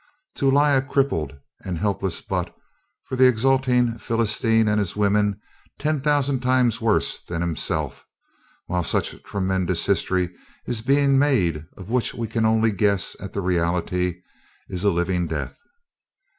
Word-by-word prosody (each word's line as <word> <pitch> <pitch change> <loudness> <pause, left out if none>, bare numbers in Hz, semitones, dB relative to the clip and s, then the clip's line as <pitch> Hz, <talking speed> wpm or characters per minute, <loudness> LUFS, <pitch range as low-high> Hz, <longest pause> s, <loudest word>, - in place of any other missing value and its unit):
To 135 - +2
lie 145 +2 +4
a 135 -2 +4
crippled 130 - -1 0.3
and 90 -3 -4
helpless 95 -1 -1
butt - - -3 0.5
for - - -5
the 130 0 +6
exulting 125 -1 +2
Philistine 115 0 +1
and 105 0 +2
his 100 -4 -2
women 105 0 +1 0.4
ten 155 0 0
thousand 145 -2 +1
times 125 -1 +2
worse 110 -2 +1
than 85 -1 -5
himself, 85 -2 -2 0.6
while 90 0 -1
such - - -2
tremendous 95 -3 -1
history 90 -2 0 0.3
is 120 -3 -2
being 140 +2 +3
made 90 - +1
of 95 +3 -9
which 125 -1 0
we 115 -1 -3
can 115 0 0
only 110 0 +3
guess 100 -2 +1
at 100 - -8
the 100 - -2
reality, 90 0 -1 0.5
is 90 -1 -4
a 105 - +4
living 90 -1 0
death. - - -5
105 Hz, 145 wpm, -23 LUFS, 90-130 Hz, 0.6 s, the